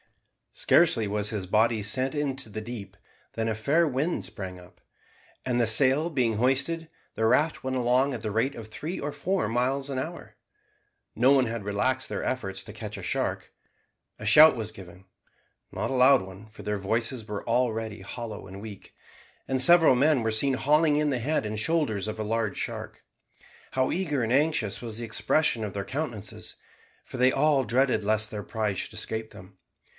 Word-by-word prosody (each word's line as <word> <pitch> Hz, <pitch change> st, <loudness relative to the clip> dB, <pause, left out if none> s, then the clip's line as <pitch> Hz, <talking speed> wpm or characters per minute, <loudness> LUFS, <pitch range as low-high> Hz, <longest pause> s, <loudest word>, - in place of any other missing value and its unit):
Scarcely 160 Hz, -11 st, +3 dB
was 105 Hz, 0 st, -1 dB
his 105 Hz, -4 st, -4 dB
body 110 Hz, +3 st, +2 dB
sent 130 Hz, +5 st, 0 dB
into 140 Hz, -4 st, -3 dB
the 110 Hz, -, -5 dB
deep, 105 Hz, -3 st, -8 dB, 0.4 s
than 115 Hz, 0 st, -2 dB
a 110 Hz, -, -1 dB
fair 150 Hz, +10 st, +2 dB
wind 145 Hz, +5 st, -1 dB
sprang 95 Hz, -4 st, -6 dB
up, 90 Hz, 0 st, -18 dB, 0.6 s
and 120 Hz, -1 st, +1 dB
the 115 Hz, -, +2 dB
sail 135 Hz, +8 st, +4 dB
being 125 Hz, -8 st, 0 dB
hoisted, 140 Hz, +7 st, 0 dB, 0.2 s
the 110 Hz, -, -1 dB
raft 150 Hz, +8 st, +2 dB
went 130 Hz, 0 st, -2 dB
along 125 Hz, +3 st, +2 dB
at 120 Hz, -, -5 dB
the 110 Hz, -1 st, -3 dB
rate 115 Hz, +6 st, 0 dB
of 115 Hz, -2 st, -8 dB
three 155 Hz, -, -6 dB
or 145 Hz, -, -3 dB
four 185 Hz, -, -1 dB
miles 130 Hz, +5 st, -1 dB
an 135 Hz, -, -3 dB
hour. 165 Hz, +6 st, -7 dB, 0.8 s
No 125 Hz, +3 st, +4 dB
one 135 Hz, -2 st, +4 dB
had 115 Hz, -2 st, -4 dB
relaxed 125 Hz, +6 st, -1 dB
their -, -, -4 dB
efforts 95 Hz, -7 st, -3 dB
to -, -, -10 dB
catch -, -, -7 dB
a -, -, -8 dB
shark. -, -, -2 dB, 0.7 s
A 105 Hz, -, -7 dB
shout 150 Hz, +9 st, +8 dB
was 110 Hz, -2 st, -5 dB
given 95 Hz, -2 st, -13 dB, 0.7 s
(not -, -, -3 dB
a -, -, -1 dB
loud 130 Hz, +1 st, +6 dB
one, 95 Hz, +3 st, -12 dB
for 110 Hz, -, -13 dB
their 105 Hz, -1 st, -2 dB
voices 115 Hz, +3 st, -2 dB
were 105 Hz, +1 st, -6 dB
already 115 Hz, -3 st, -1 dB
hollow 105 Hz, 0 st, -7 dB
and 95 Hz, 0 st, -10 dB
weak), 105 Hz, -2 st, -10 dB, 0.5 s
and 130 Hz, -1 st, +1 dB
several 165 Hz, -1 st, +7 dB
men 140 Hz, +1 st, +3 dB
were 110 Hz, 0 st, 0 dB
seen 130 Hz, +5 st, +3 dB
hauling 150 Hz, +3 st, +3 dB
in 150 Hz, 0 st, +1 dB
the 130 Hz, -, -1 dB
head 145 Hz, 0 st, -1 dB
and 105 Hz, 0 st, -4 dB
shoulders 110 Hz, -, 0 dB
of 110 Hz, 0 st, -5 dB
a -, -, -1 dB
large 110 Hz, -1 st, -2 dB
shark. -, -, -6 dB, 0.7 s
How 130 Hz, 0 st, 0 dB
eager 160 Hz, -7 st, -1 dB
and 115 Hz, +2 st, 0 dB
anxious 140 Hz, -7 st, +1 dB
was 115 Hz, -3 st, -5 dB
the 120 Hz, -, -4 dB
expression 120 Hz, +1 st, +1 dB
of 105 Hz, -3 st, -5 dB
their 100 Hz, -1 st, -4 dB
countenances, 125 Hz, -8 st, -6 dB, 0.5 s
for -, -, -9 dB
they 130 Hz, +1 st, +4 dB
all 140 Hz, -1 st, +2 dB
dreaded 125 Hz, +1 st, +1 dB
lest 110 Hz, +1 st, +1 dB
their 105 Hz, -1 st, -5 dB
prize 105 Hz, -4 st, -2 dB
should -, -, -4 dB
escape 110 Hz, 0 st, -4 dB
them. 95 Hz, +1 st, -15 dB
120 Hz, 190 wpm, -27 LUFS, 110-135 Hz, 0.8 s, shout